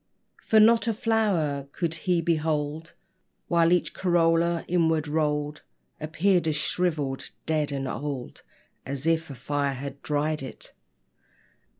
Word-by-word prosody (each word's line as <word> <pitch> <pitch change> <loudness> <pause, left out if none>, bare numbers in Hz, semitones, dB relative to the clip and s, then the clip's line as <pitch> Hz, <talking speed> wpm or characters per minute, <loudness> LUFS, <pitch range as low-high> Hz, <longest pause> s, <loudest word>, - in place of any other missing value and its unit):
For 220 - +4
not 230 +2 +5
a 225 - +1
flower 200 - 0
could 170 -3 -1
he 170 +1 0
behold, 155 -1 -1 0.6
While 170 -1 +4
each 180 -1 +2
corolla, 170 -1 +2
inward 160 -3 +1
rolled, 150 -1 -1 0.4
Appeared 170 +3 +1
as 155 - +1
shrivelled, 150 -3 -1 0.2
dead, 155 -2 0
and 135 -1 -3
old 140 -2 -5 0.4
As 140 +1 -5
if 165 -1 +1
a 140 - -7
fire 140 +2 -1
had 140 +1 -7
dried 150 +1 -1
it. 130 - -9
160 Hz, 125 wpm, -26 LUFS, 145-170 Hz, 0.6 s, not